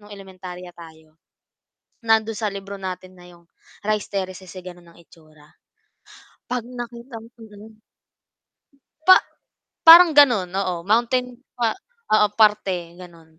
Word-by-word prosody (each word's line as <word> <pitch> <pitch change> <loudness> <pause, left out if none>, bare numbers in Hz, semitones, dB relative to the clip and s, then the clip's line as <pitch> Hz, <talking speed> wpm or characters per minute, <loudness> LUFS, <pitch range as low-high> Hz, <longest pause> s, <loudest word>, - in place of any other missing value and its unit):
nung 205 0 -18
elementarya 185 -2 -11
tayo 160 -2 -16 0.9
nandun 220 0 +1
sa 215 -2 -2
libro 200 0 -8
natin 185 -1 -8
na 180 - -16
yung 170 -1 -19 0.4
Rice 215 -1 -1
Terraces 185 -2 -6
ay 185 - -9
ganun 175 -2 -13
ang - - -21
itsura? 155 -2 -22 1.1
Pag 245 -2 -3
nakita 240 -1 -9
mo 230 - -16
mm. 215 0 -15 1.2
Pa 370 - +7 0.7
parang 335 +1 +10
ganun. 240 -11 +4
Oo, 180 -3 -3
mountain 240 +5 0 0.2
pa 235 -2 -1 0.4
oo 215 -1 +5
parte 190 -5 +1
ganun. 165 -3 -16
195 Hz, 125 wpm, -21 LUFS, 175-225 Hz, 1.2 s, parang